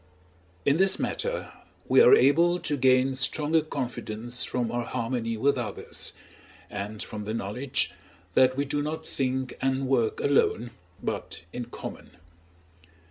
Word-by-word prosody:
In 140 Hz, +2 st, +4 dB
this 190 Hz, +1 st, +4 dB
matter -, -, -3 dB, 0.4 s
we -, -, +6 dB
are 465 Hz, -2 st, +9 dB
able 170 Hz, -, +4 dB
to 150 Hz, -3 st, -1 dB
gain 130 Hz, 0 st, +4 dB
stronger 150 Hz, +4 st, +2 dB
confidence 120 Hz, -4 st, -3 dB
from 120 Hz, -2 st, -1 dB
our 120 Hz, 0 st, -1 dB
harmony 115 Hz, -2 st, -2 dB
with 140 Hz, +3 st, +2 dB
others, 120 Hz, -, -4 dB, 0.6 s
and 105 Hz, +1 st, -5 dB
from 105 Hz, -, -6 dB
the 110 Hz, +2 st, -3 dB
knowledge 120 Hz, +6 st, -2 dB, 0.4 s
that 130 Hz, 0 st, +4 dB
we 140 Hz, -, +1 dB
do 145 Hz, +1 st, -1 dB
not 155 Hz, +2 st, -4 dB
think 130 Hz, -1 st, -2 dB
and 135 Hz, 0 st, 0 dB
work 120 Hz, -4 st, +1 dB
alone, 120 Hz, -4 st, +2 dB, 0.3 s
but -, -, -4 dB
in 125 Hz, -1 st, -4 dB
common. 120 Hz, -, -9 dB
130 Hz, 135 wpm, -27 LUFS, 120-145 Hz, 0.6 s, are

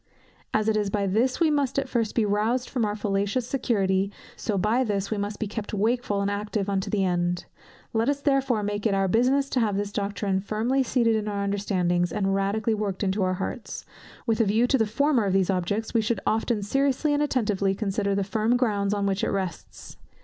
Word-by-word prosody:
As 215 Hz, 0 st, +1 dB
it 220 Hz, -, +2 dB
is 210 Hz, -2 st, 0 dB
by 200 Hz, 0 st, 0 dB
this 225 Hz, +7 st, +1 dB
we 325 Hz, -3 st, +3 dB
must 285 Hz, -3 st, 0 dB
at 275 Hz, -1 st, 0 dB
first 230 Hz, -4 st, -1 dB
be 225 Hz, -, +3 dB
rouzed 220 Hz, +5 st, 0 dB
from 245 Hz, -4 st, 0 dB
our 205 Hz, 0 st, -2 dB
fallacious 205 Hz, +3 st, -1 dB
security, 200 Hz, -7 st, 0 dB, 0.2 s
so 210 Hz, -3 st, -2 dB
by 220 Hz, +7 st, +2 dB
this 200 Hz, -3 st, -2 dB
we 215 Hz, -, 0 dB
must 205 Hz, +1 st, -3 dB
be 220 Hz, -, -1 dB
kept 210 Hz, 0 st, -5 dB
wakeful 210 Hz, -1 st, 0 dB
and 200 Hz, 0 st, 0 dB
active 205 Hz, 0 st, -2 dB
unto 190 Hz, -1 st, -1 dB
the 200 Hz, -2 st, +1 dB
end. 175 Hz, -1 st, 0 dB, 0.5 s
Let 225 Hz, +3 st, +2 dB
us 285 Hz, 0 st, 0 dB
therefore 270 Hz, -6 st, +1 dB
make 205 Hz, +1 st, -1 dB
it 200 Hz, -, +1 dB
our 195 Hz, 0 st, +2 dB
business 255 Hz, +7 st, +2 dB
to 255 Hz, -, +1 dB
have 210 Hz, -4 st, +1 dB
this 205 Hz, 0 st, -2 dB
doctrine 200 Hz, -1 st, -1 dB
firmly 225 Hz, +7 st, 0 dB
seated 235 Hz, -3 st, +2 dB
in 215 Hz, -1 st, -2 dB
our 200 Hz, -1 st, -2 dB
understandings, 180 Hz, -3 st, 0 dB
and 195 Hz, 0 st, 0 dB
radically 205 Hz, +3 st, 0 dB
worked 205 Hz, -2 st, -2 dB
into 195 Hz, +1 st, 0 dB
our 185 Hz, 0 st, +1 dB
hearts. 200 Hz, +5 st, -5 dB, 0.4 s
With 225 Hz, -1 st, +2 dB
a -, -, +3 dB
view 215 Hz, +4 st, +3 dB
to 270 Hz, +2 st, +3 dB
the 225 Hz, -, +2 dB
former 265 Hz, +1 st, +2 dB
of 195 Hz, -, 0 dB
these 195 Hz, 0 st, +2 dB
objects, 200 Hz, +4 st, -2 dB
we 230 Hz, -, +3 dB
should 220 Hz, +2 st, -1 dB
often 220 Hz, -1 st, 0 dB
seriously 275 Hz, +6 st, +1 dB
and 290 Hz, -, +1 dB
attentively 210 Hz, -9 st, +1 dB
consider 200 Hz, -1 st, -1 dB
the 200 Hz, -, +1 dB
firm 220 Hz, +4 st, +1 dB
grounds 205 Hz, -5 st, +1 dB
on 200 Hz, -1 st, -1 dB
which 195 Hz, 0 st, 0 dB
it -, -, +1 dB
rests. 190 Hz, -3 st, -5 dB
210 Hz, 215 wpm, -26 LUFS, 200-235 Hz, 0.5 s, we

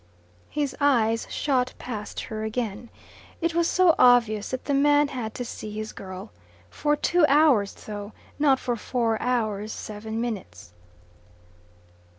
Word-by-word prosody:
His 290 Hz, -3 st, -2 dB
eyes 230 Hz, -5 st, +2 dB
shot 255 Hz, -3 st, 0 dB
past 215 Hz, -4 st, -6 dB
her 215 Hz, 0 st, -5 dB
again. 220 Hz, 0 st, -3 dB, 0.5 s
It 335 Hz, -1 st, 0 dB
was 340 Hz, 0 st, +2 dB
so 365 Hz, -2 st, +4 dB
obvious 230 Hz, -4 st, +4 dB
that 260 Hz, -, -4 dB
the 285 Hz, -, 0 dB
man 290 Hz, +1 st, +4 dB
had 230 Hz, -5 st, -5 dB
to 245 Hz, -, -4 dB
see 215 Hz, -, -7 dB
his 215 Hz, 0 st, -5 dB
girl. 185 Hz, -1 st, -8 dB, 0.4 s
For 295 Hz, 0 st, +1 dB
two 350 Hz, +3 st, +2 dB
hours 280 Hz, -9 st, +4 dB
though 205 Hz, 0 st, -6 dB, 0.3 s
not 275 Hz, -3 st, +4 dB
for 245 Hz, -, -1 dB
four 230 Hz, 0 st, -1 dB
hours 220 Hz, -4 st, -1 dB
seven 220 Hz, +1 st, -6 dB
minutes. 100 Hz, -, -5 dB
240 Hz, 140 wpm, -25 LUFS, 215-280 Hz, 0.5 s, so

